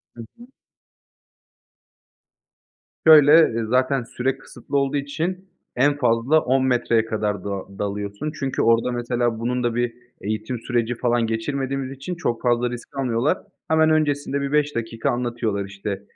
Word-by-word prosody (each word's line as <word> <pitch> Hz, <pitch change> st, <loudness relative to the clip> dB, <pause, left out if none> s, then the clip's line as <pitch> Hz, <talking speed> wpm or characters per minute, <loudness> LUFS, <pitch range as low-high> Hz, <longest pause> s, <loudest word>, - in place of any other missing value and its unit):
Hı 120 Hz, -, -8 dB, 0.2 s
hı. 240 Hz, -, -14 dB, 2.6 s
Şöyle, 150 Hz, -2 st, +8 dB, 0.2 s
eee, 115 Hz, -, -1 dB
zaten 130 Hz, +2 st, +1 dB
süre 130 Hz, +3 st, -2 dB
kısıtlı 135 Hz, +2 st, -5 dB
olduğu 140 Hz, +1 st, +1 dB
için 175 Hz, +7 st, -3 dB, 0.3 s
en 145 Hz, +3 st, +3 dB
fazla 125 Hz, +3 st, +3 dB
10 130 Hz, -1 st, +1 dB
metreye 120 Hz, -3 st, +2 dB
kadar 105 Hz, -3 st, -2 dB
da 100 Hz, -, -4 dB, 0.3 s
dalıyorsun. 100 Hz, +7 st, -3 dB
Çünkü 135 Hz, -2 st, -1 dB
orada, 115 Hz, +2 st, +3 dB
mesela, 120 Hz, -1 st, -1 dB
bunun 125 Hz, +2 st, -1 dB
da 120 Hz, -1 st, 0 dB
bir 120 Hz, -1 st, 0 dB, 0.3 s
eğitim 110 Hz, +4 st, -3 dB
süreci, 120 Hz, 0 st, -1 dB
falan, 120 Hz, -1 st, +1 dB
geçirmediğimiz 135 Hz, +4 st, -2 dB
için 135 Hz, +7 st, -6 dB
çok 120 Hz, -9 st, -2 dB
fazla 120 Hz, 0 st, +1 dB
risk 120 Hz, +2 st, -9 dB
almıyorlar. 125 Hz, 0 st, +1 dB, 0.3 s
Hemen 160 Hz, 0 st, +4 dB
öncesinde 145 Hz, -2 st, +1 dB
bir 140 Hz, 0 st, -3 dB
5 150 Hz, 0 st, +1 dB
dakika 115 Hz, 0 st, -2 dB
anlatıyorlar. 120 Hz, -4 st, -2 dB
İşte, 100 Hz, 0 st, -5 dB
125 Hz, 140 wpm, -22 LUFS, 115-140 Hz, 2.6 s, Şöyle